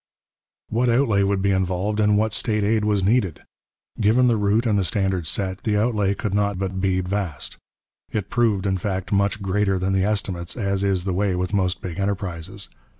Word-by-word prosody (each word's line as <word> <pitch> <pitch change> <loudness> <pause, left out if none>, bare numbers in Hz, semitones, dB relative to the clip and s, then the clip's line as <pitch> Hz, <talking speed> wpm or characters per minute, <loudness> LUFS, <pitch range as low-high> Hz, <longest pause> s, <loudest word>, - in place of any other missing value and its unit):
What 120 +2 +1
outlay 115 -4 +3
would 100 -1 +1
be 100 - +3
involved 95 +2 0
and 105 -1 +4
what 110 0 +1
state 105 -3 0
aid 105 +1 +2
was 105 -2 +1
needed? 100 -4 +1 0.6
Given 115 +4 +4
the 120 -2 +4
route 105 +3 +1
and 105 -3 +2
the - - +1
standard 95 -1 0
set, 95 +3 -2
the 105 -2 0
outlay 105 -3 +1
could 105 -2 -3
not 100 -1 +1
but 95 0 -3
be 95 -1 +1
vast. 90 -6 -3 0.5
It 105 -3 -3
proved, 110 -5 +1
in 95 -1 +1
fact, 95 -1 -3
much 100 0 +1
greater 95 0 +1
than 95 +1 0
the 95 -1 +2
estimates, 95 -4 -2
as 100 -3 -1
is 95 -3 +1
the 95 -1 -1
way 95 0 +1
with 90 +2 -2
most 95 -2 0
big 90 -2 -5
enterprises. 95 -4 -3
100 Hz, 195 wpm, -23 LUFS, 95-105 Hz, 0.6 s, and